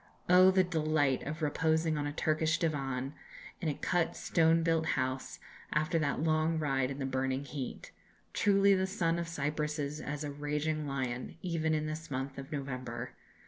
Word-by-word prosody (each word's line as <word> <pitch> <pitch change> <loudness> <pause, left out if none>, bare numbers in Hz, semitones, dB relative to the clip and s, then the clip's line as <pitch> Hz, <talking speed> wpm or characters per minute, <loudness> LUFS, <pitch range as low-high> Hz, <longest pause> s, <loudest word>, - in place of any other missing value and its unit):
Oh! 185 +1 +8
the 190 0 +4
delight 155 -5 +1
of 155 +2 -4
reposing 160 +1 +2
on 145 -1 -1
a - - -2
Turkish 155 +1 +1
divan, 135 -5 -1 0.5
in 165 - 0
a 145 - -1
cut 175 -2 0
stone 165 0 +3
built 165 -1 +2
house, 130 +1 -2 0.3
after 155 +2 +1
that 145 0 0
long 160 0 +2
ride 135 -4 +1
in 140 - -5
the 135 - -2
burning 130 +1 -1
heat! 135 -1 -6 0.4
Truly, 200 0 +4
the 190 0 +2
sun 170 -3 0
of 170 - -3
Cyprus 150 -1 -2
is 150 +1 -3
as 150 +1 -4
a 145 - -3
raging 150 +1 -2
lion, 130 -2 -3
even 160 -3 0
in 155 0 -1
this 155 +1 -5
month 135 0 -3
of 135 +3 -9
November. 125 -4 -4
150 Hz, 175 wpm, -32 LUFS, 140-160 Hz, 0.5 s, Oh